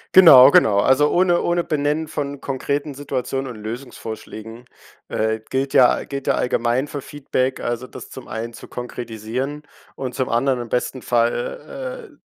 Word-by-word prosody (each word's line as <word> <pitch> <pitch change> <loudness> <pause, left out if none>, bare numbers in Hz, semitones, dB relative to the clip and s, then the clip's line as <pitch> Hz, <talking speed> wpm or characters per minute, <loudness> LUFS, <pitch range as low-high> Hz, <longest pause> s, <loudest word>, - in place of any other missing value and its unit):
Genau, 140 -8 +10
genau, 100 -7 +5
also 130 +7 +4
ohne 175 -1 +3
ohne 175 0 +1
Benennen 150 +1 0
von 145 -1 -4
konkreten 140 +2 -3
Situationen 135 -1 -3
und 110 -3 -10
Lösungsvorschlägen, 110 -1 -8 0.5
äh, 110 0 -1
gilt, 135 +1 -1
ja 125 - +5
gilt, 140 -1 -6
ja, - - +3
allgemein 125 +3 0
für 145 - -5
Feedback 130 -2 -2
Also 120 +2 -3
das - - -10
zum 130 - -10
einen 115 +1 -5
zu - - -12
konkretisieren 125 +4 -5 0.3
und 130 -2 -5
zum 130 - -1
anderen 125 +1 +1
im 120 - -8
besten 125 - -2
Fall, - - -2
äh, - - -24
130 Hz, 155 wpm, -21 LUFS, 120-145 Hz, 0.5 s, Genau